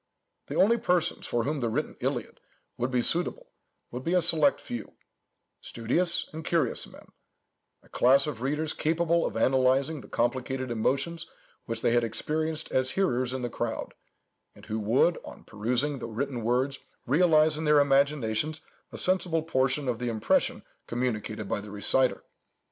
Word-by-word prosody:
The -, -, -5 dB
only 230 Hz, +5 st, +4 dB
persons 180 Hz, -2 st, 0 dB
for 120 Hz, -1 st, 0 dB
whom 150 Hz, +1 st, -2 dB
the 120 Hz, -3 st, -1 dB
written 145 Hz, +8 st, -2 dB
Iliad -, -, -3 dB, 0.4 s
would 120 Hz, +1 st, -2 dB
be 125 Hz, -2 st, +1 dB
suitable -, -, 0 dB, 0.4 s
would 125 Hz, +2 st, -6 dB
be 170 Hz, +5 st, 0 dB
a 180 Hz, -, +4 dB
select 155 Hz, -4 st, +3 dB
few; 120 Hz, -2 st, -7 dB, 0.7 s
studious 170 Hz, +10 st, +2 dB
and 160 Hz, +1 st, -6 dB
curious 155 Hz, -7 st, 0 dB
men; -, -, -16 dB, 0.7 s
a -, -, -23 dB
class 135 Hz, +3 st, +4 dB
of 140 Hz, -7 st, -5 dB
readers 150 Hz, +4 st, -1 dB
capable 165 Hz, +1 st, +1 dB
of 110 Hz, -, -5 dB
analyzing 130 Hz, +4 st, +2 dB
the -, -, -13 dB
complicated 130 Hz, +1 st, -2 dB
emotions 140 Hz, +9 st, -1 dB, 0.4 s
which 115 Hz, 0 st, -4 dB
they -, -, +3 dB
had 120 Hz, 0 st, +3 dB
experienced 155 Hz, +7 st, -2 dB
as 130 Hz, 0 st, +1 dB
hearers 130 Hz, -9 st, 0 dB
in 130 Hz, -1 st, -4 dB
the -, -, 0 dB
crowd, -, -, -4 dB, 0.6 s
and -, -, -15 dB
who 110 Hz, +1 st, -3 dB
would, 120 Hz, +11 st, +2 dB
on -, -, -11 dB
perusing 125 Hz, +7 st, -1 dB
the -, -, -5 dB
written 120 Hz, +1 st, -3 dB
words, 130 Hz, +4 st, 0 dB, 0.3 s
realize 155 Hz, +2 st, +4 dB
in 160 Hz, +1 st, -4 dB
their 150 Hz, -1 st, +5 dB
imaginations 140 Hz, 0 st, +1 dB, 0.3 s
a -, -, -8 dB
sensible 175 Hz, -3 st, +1 dB
portion 135 Hz, -2 st, 0 dB
of 120 Hz, -2 st, -1 dB
the 125 Hz, -1 st, -2 dB
impression 110 Hz, -2 st, +1 dB, 0.2 s
communicated 110 Hz, -3 st, -3 dB
by 105 Hz, -, -2 dB
the 105 Hz, -, -10 dB
reciter. 115 Hz, +5 st, +1 dB
135 Hz, 160 wpm, -28 LUFS, 120-155 Hz, 0.7 s, their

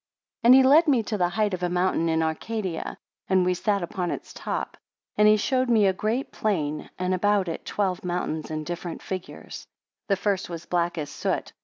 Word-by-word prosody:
5 -, -, -7 dB
And 250 Hz, -, +10 dB
he 265 Hz, -, +7 dB
led 300 Hz, +6 st, +6 dB
me 260 Hz, -6 st, +3 dB
to 215 Hz, -, -3 dB
the 180 Hz, -3 st, +1 dB
height 210 Hz, +2 st, 0 dB
of 180 Hz, -, -3 dB
a 180 Hz, -, 0 dB
mountain 180 Hz, -2 st, +1 dB
in 160 Hz, 0 st, +2 dB
Arcadia, 180 Hz, +2 st, -3 dB, 0.3 s
and 185 Hz, -1 st, +3 dB
we 180 Hz, -, +2 dB
sat 200 Hz, +1 st, 0 dB
upon 175 Hz, +1 st, -3 dB
its -, -, -6 dB
top. -, -, -4 dB, 0.4 s
And 210 Hz, -, +5 dB
he 215 Hz, 0 st, +6 dB
showed 255 Hz, +4 st, +1 dB
me 220 Hz, -3 st, +4 dB
a 190 Hz, -, +3 dB
great 220 Hz, +7 st, -2 dB
plain, 155 Hz, -8 st, -2 dB
and 185 Hz, +1 st, 0 dB
about 200 Hz, 0 st, +2 dB
it 165 Hz, -, -5 dB
twelve 190 Hz, -3 st, -1 dB
mountains 175 Hz, -3 st, -3 dB
in 155 Hz, -1 st, -3 dB
different 175 Hz, +1 st, -6 dB
figures. 185 Hz, -1 st, -6 dB
6 -, -, -16 dB, 0.4 s
The 200 Hz, -, +3 dB
first 195 Hz, -1 st, -1 dB
was 170 Hz, -1 st, -7 dB
black 175 Hz, -1 st, 0 dB
as 145 Hz, -2 st, -4 dB
soot. -, -, -2 dB
185 Hz, 210 wpm, -25 LUFS, 175-210 Hz, 0.4 s, And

